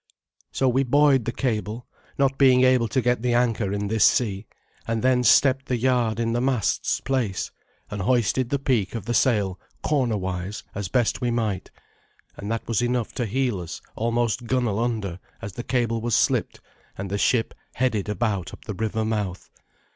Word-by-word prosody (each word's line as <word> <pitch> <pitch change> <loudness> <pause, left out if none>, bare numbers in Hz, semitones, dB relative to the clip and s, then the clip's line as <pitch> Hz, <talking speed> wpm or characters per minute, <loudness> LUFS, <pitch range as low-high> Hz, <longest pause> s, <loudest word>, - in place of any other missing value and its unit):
So 135 - +1
we 130 +2 +3
buoyed 135 -1 +4
the 120 - -1
cable, 115 -2 -2 0.3
not 135 -1 +1
being 130 -2 +6
able 130 -2 +4
to 125 +4 0
get 125 -2 +1
the 120 0 +1
anchor 115 -5 +1
in 100 0 -2
this 110 +1 +2
sea, 100 -4 +2 0.4
and 115 0 -1
then 130 -1 +3
stepped 135 +2 +4
the 125 - 0
yard 120 -2 +1
in 115 0 0
the 120 - 0
mast's 130 -4 0
place, 125 -8 -1 0.4
and 105 -2 -3
hoisted 120 +3 +1
the 140 - +1
peak 120 -7 0
of 110 -4 -5
the 120 - -1
sail 105 -6 +2 0.2
corner 130 -7 +1
wise 95 +1 -4
as 100 -1 -3
best 120 +6 +1
we 125 - +1
might; 110 -5 -1 0.7
and 100 +2 -6
that 115 - -3
was 115 -2 +1
enough 120 -1 -1
to 120 - -2
heel 125 -2 0
us 85 - -7 0.2
almost 115 +1 -1
gunwale 120 -4 0
under 110 -7 -2 0.2
as 110 -4 -7
the 120 - -6
cable 115 -3 0
was 120 -1 +1
slipped - - +1 0.4
and 95 0 -5
the 100 - -1
ship 115 0 +2 0.2
headed 110 -5 0
about 105 -4 -1
up - - -20
the 105 - -4
river 110 +2 -2
mouth. 105 -4 -3
115 Hz, 185 wpm, -24 LUFS, 105-125 Hz, 0.7 s, being